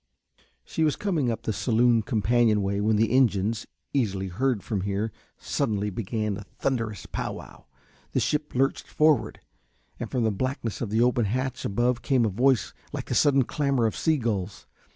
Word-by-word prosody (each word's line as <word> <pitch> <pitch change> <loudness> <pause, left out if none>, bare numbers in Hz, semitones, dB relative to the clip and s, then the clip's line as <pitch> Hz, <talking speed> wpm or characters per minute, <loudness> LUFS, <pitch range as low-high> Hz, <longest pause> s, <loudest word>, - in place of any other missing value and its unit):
She 160 - -1
was 155 -2 +2
coming 165 -11 0
up 115 - -3
the 110 - -1
saloon 115 +2 +3
companion 110 -1 +2
way 100 +1 -1
when 110 +1 +2
the 110 +1 +2
engines, 115 -4 +2 0.3
easily 100 -8 0
heard 120 +3 0
from 105 -4 -2
here, 100 +3 -2 0.3
suddenly 105 -1 -1
began 105 0 -2
a 105 - -8
thunderous 115 -7 -2
pow - - -4
wow; - - -12 0.5
the - - +2
ship 150 -2 -1
lurched 135 +2 +1
forward, 150 -5 +2 0.6
and - - -4
from 125 - 0
the 110 - +2
blackness 120 +1 -3
of 115 - -2
the 110 +2 +2
open 125 -2 +2
hatch 130 +5 -2
above 120 +4 +1
came 130 -5 +2
a - - +2
voice 120 0 +2 0.2
like - - -4
the - - -3
sudden 140 -2 +4
clamour 140 -2 0
of 110 - 0
sea 160 -1 +2
gulls. 105 -6 -3
115 Hz, 175 wpm, -26 LUFS, 105-130 Hz, 0.6 s, sudden